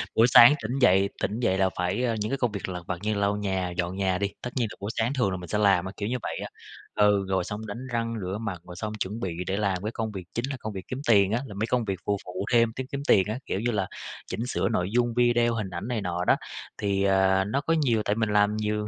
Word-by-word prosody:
buổi 115 Hz, +2 st, +6 dB
sáng 120 Hz, +3 st, +9 dB
tỉnh 125 Hz, +5 st, -2 dB
dậy 95 Hz, -4 st, +4 dB
tỉnh 110 Hz, +4 st, -1 dB
dậy 95 Hz, -6 st, +1 dB
là 95 Hz, -1 st, +3 dB
phải, 90 Hz, +7 st, 0 dB
ờ, 115 Hz, -2 st, +1 dB
những 105 Hz, +3 st, -2 dB
cái 135 Hz, -, 0 dB
công 125 Hz, -4 st, 0 dB
việc 100 Hz, -2 st, -5 dB
lặt 90 Hz, -1 st, -5 dB
vặt 90 Hz, -, -2 dB
như 110 Hz, 0 st, 0 dB
lau 100 Hz, 0 st, +1 dB
nhà, 95 Hz, -3 st, -1 dB
dọn 90 Hz, +1 st, -1 dB
nhà 95 Hz, -2 st, 0 dB
đi, 100 Hz, 0 st, 0 dB
tất 125 Hz, -, -4 dB
nhiên 120 Hz, -3 st, +1 dB
là -, -, -9 dB
buổi 100 Hz, -, -3 dB
sáng 115 Hz, +4 st, +1 dB
thường 110 Hz, -8 st, +1 dB
là 95 Hz, -, -2 dB
mình 90 Hz, -1 st, -8 dB
sẽ 105 Hz, -, 0 dB
làm 100 Hz, -3 st, +3 dB
á, 95 Hz, -, -5 dB
kiểu 105 Hz, +1 st, -2 dB
như 125 Hz, -, 0 dB
vậy -, -, -3 dB
á, -, -, -6 dB, 0.5 s
ừ, 105 Hz, -2 st, +3 dB
rồi 95 Hz, -2 st, +1 dB
xong 105 Hz, +3 st, -6 dB
đánh 120 Hz, +5 st, -6 dB
răng 115 Hz, 0 st, -1 dB
rửa 95 Hz, +2 st, -3 dB
mặt, 95 Hz, -7 st, -4 dB
rồi 90 Hz, -, -10 dB
xong 110 Hz, +3 st, -4 dB
chuẩn 105 Hz, +1 st, -4 dB
bị 95 Hz, -6 st, -3 dB
để 95 Hz, +1 st, -1 dB
làm 100 Hz, -2 st, 0 dB
cái 110 Hz, -, -2 dB
công 110 Hz, -1 st, -3 dB
việc 95 Hz, -3 st, -6 dB
chính 120 Hz, +2 st, -1 dB
là 135 Hz, -, -3 dB
công 110 Hz, -2 st, -5 dB
việc 95 Hz, -1 st, -7 dB
kiếm 130 Hz, +2 st, -5 dB
tiền 100 Hz, -3 st, +5 dB
á, 115 Hz, -, +1 dB
là 105 Hz, -, -9 dB
mấy 110 Hz, -, 0 dB
công 120 Hz, -3 st, 0 dB
việc 95 Hz, -3 st, -3 dB
phụ 100 Hz, 0 st, +1 dB
phụ 90 Hz, +2 st, -4 dB
thêm 115 Hz, -1 st, +4 dB
kiếm 130 Hz, -, -4 dB
kiếm 140 Hz, 0 st, -3 dB
tiền 95 Hz, -, +6 dB
á, 110 Hz, +4 st, -3 dB
kiểu 95 Hz, -, -2 dB
như 120 Hz, +2 st, 0 dB
là 100 Hz, -3 st, -1 dB, 0.4 s
chỉnh 115 Hz, -, -3 dB
sửa -, -, 0 dB
nội 90 Hz, +1 st, 0 dB
dung 120 Hz, -1 st, +2 dB
video, 120 Hz, -1 st, +3 dB
hình 105 Hz, -4 st, -3 dB
ảnh 90 Hz, +5 st, -5 dB
này 120 Hz, -4 st, -2 dB
nọ 90 Hz, -1 st, -2 dB
đó, -, -, +5 dB, 0.4 s
thì, 100 Hz, -1 st, 0 dB
à, 95 Hz, 0 st, +3 dB
nó 135 Hz, +7 st, -1 dB
có 165 Hz, +3 st, 0 dB
nhiều, 115 Hz, -6 st, +2 dB
tại 105 Hz, -, +1 dB
mình 110 Hz, -1 st, 0 dB
làm 105 Hz, 0 st, +3 dB
nhiều, 105 Hz, 0 st, -1 dB
105 Hz, 295 wpm, -26 LUFS, 95-115 Hz, 0.5 s, sáng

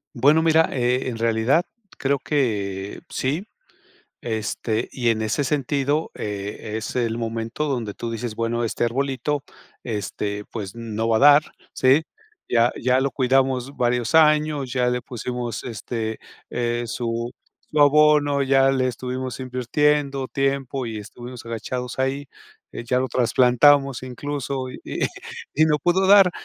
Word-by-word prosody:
Bueno, 145 Hz, +6 st, +4 dB
mira, 160 Hz, 0 st, +4 dB
eh, 125 Hz, 0 st, 0 dB
en 120 Hz, -3 st, -3 dB
realidad 115 Hz, +7 st, +2 dB, 0.3 s
creo 140 Hz, +1 st, 0 dB
que 100 Hz, -9 st, -2 dB
sí. 150 Hz, +10 st, -2 dB, 0.8 s
Este, 110 Hz, 0 st, -2 dB
y 120 Hz, -3 st, -1 dB
en 110 Hz, -1 st, 0 dB
ese 110 Hz, +7 st, 0 dB
sentido, 145 Hz, +2 st, 0 dB
eh, 105 Hz, +1 st, -5 dB
es 110 Hz, +3 st, -5 dB
el 115 Hz, -2 st, 0 dB
momento 115 Hz, +4 st, -3 dB
donde 120 Hz, -8 st, -2 dB
tú 115 Hz, -, -5 dB
dices: 115 Hz, 0 st, -4 dB
"Bueno, 115 Hz, +1 st, -1 dB
este 115 Hz, -, -1 dB
arbolito, 135 Hz, +3 st, -1 dB, 0.4 s
este, 105 Hz, -2 st, -4 dB
pues, 100 Hz, -3 st, -6 dB
no 115 Hz, -1 st, -3 dB
va 115 Hz, -, +3 dB
a -, -, +1 dB
dar, 145 Hz, +1 st, +8 dB, 0.3 s
¿sí? 135 Hz, +5 st, +4 dB, 0.4 s
Ya 120 Hz, 0 st, +3 dB
ya 125 Hz, +2 st, +3 dB
lo 135 Hz, 0 st, 0 dB
cuidamos 130 Hz, 0 st, +1 dB
varios 125 Hz, +2 st, 0 dB
años, 150 Hz, -4 st, +3 dB
ya 125 Hz, -2 st, +1 dB
le 125 Hz, 0 st, -1 dB
pusimos, 120 Hz, -2 st, -5 dB
este, 110 Hz, -1 st, -4 dB, 0.3 s
eh, 120 Hz, 0 st, -1 dB
su 115 Hz, +1 st, -3 dB, 0.4 s
su 150 Hz, -, 0 dB
abono, 145 Hz, -1 st, +5 dB
ya 135 Hz, 0 st, +4 dB
le 130 Hz, -1 st, +1 dB
estuvimos 130 Hz, +1 st, -4 dB
invirtiendo 135 Hz, +2 st, 0 dB
tiempo 135 Hz, -1 st, -1 dB
y 110 Hz, -1 st, -5 dB
estuvimos 120 Hz, +4 st, -9 dB
agachados 120 Hz, +2 st, -5 dB
ahí, 135 Hz, +1 st, -1 dB, 0.4 s
eh, -, -, -7 dB
ya 125 Hz, +2 st, +1 dB
lo 130 Hz, -, -1 dB
trasplantamos 130 Hz, +3 st, +4 dB
incluso 135 Hz, 0 st, -4 dB
y -, -, -10 dB, 0.7 s
y 155 Hz, -, +5 dB
no 150 Hz, -1 st, +2 dB
pudo 175 Hz, +5 st, +2 dB
dar". 195 Hz, -1 st, +7 dB
125 Hz, 145 wpm, -23 LUFS, 115-140 Hz, 0.8 s, dar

